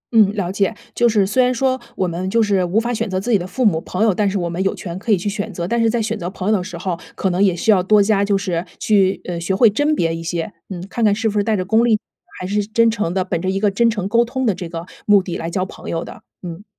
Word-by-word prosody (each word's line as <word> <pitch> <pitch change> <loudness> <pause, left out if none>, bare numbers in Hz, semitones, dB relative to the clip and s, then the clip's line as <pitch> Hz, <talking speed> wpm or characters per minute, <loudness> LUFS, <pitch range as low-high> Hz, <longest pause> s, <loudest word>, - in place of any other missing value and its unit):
嗯， 210 -3 +6
了 185 -4 -2
解。 195 +2 0 0.2
就 240 0 +3
是 210 -3 +3
虽 255 +6 +3
然 250 - +2
说， 260 +1 0 0.2
我 185 - 0
们 180 +2 -3
就 230 +2 +2
是 200 -3 +2
无 185 +5 +1
法 240 +1 -2
选 215 - -2
择 185 0 -1
自 240 +5 -3
己 210 - +5
的 175 - -5
父 255 +6 -1
母、 165 -6 +3
朋 185 - -2
友， 220 -3 +4
但 205 +1 +1
是 200 - -2
我 175 -2 -1
们 170 +2 -3
有 195 - +1
权 175 -1 -6
可 220 - -2
以 200 - +5
去 180 - -5
选 205 0 -3
择。 170 0 -4
但 235 +2 0
是 230 - +3
在 235 +1 0
选 225 0 -2
择 175 +1 -3
朋 190 0 -5
友 215 - +4
的 185 - -1
时 180 -2 -7
候， 175 -1 -3 0.2
可 190 - 0
能 185 +3 +2
也 185 -3 +3
需 215 - +2
要 190 -3 +4
多 210 +2 +5
加 200 -1 +2
就 200 -1 +2
是 180 -4 -2 0.2
去， 195 -3 +2
呃， 175 -2 -4
学 180 +3 -1
会 225 +2 +6
甄 295 +7 +1
别 165 - 0
一 165 - -6
些。 170 +4 -3 0.2
嗯， 180 -1 -6
看 235 - -3
看 210 -2 +4
是 220 +2 -1
不 210 -1 -1
是 205 - +2
带 220 -1 +1
着 185 - -2
功 220 +4 +3
利， 220 -3 +3 0.4
还 180 - -5
是 205 +1 0
真 230 +2 +3
诚 210 -6 -2
的， 185 -1 +1
本 170 -2 -3
着 185 - -1
一 195 +1 0
个 205 -1 +2
真 235 +4 +3
诚 210 -4 -2
沟 235 +3 +3
通 260 +2 -3
的 215 - +3
这 180 -2 -7
个 165 0 -6 0.2
目 200 -2 +5
的 175 - -5
来 165 - -4
交 185 +2 -1
朋 - - -10
友 165 0 -2
的， - - -11 0.2
嗯。 175 +2 -7
200 Hz, 340 characters per minute, -19 LUFS, 180-220 Hz, 0.4 s, 嗯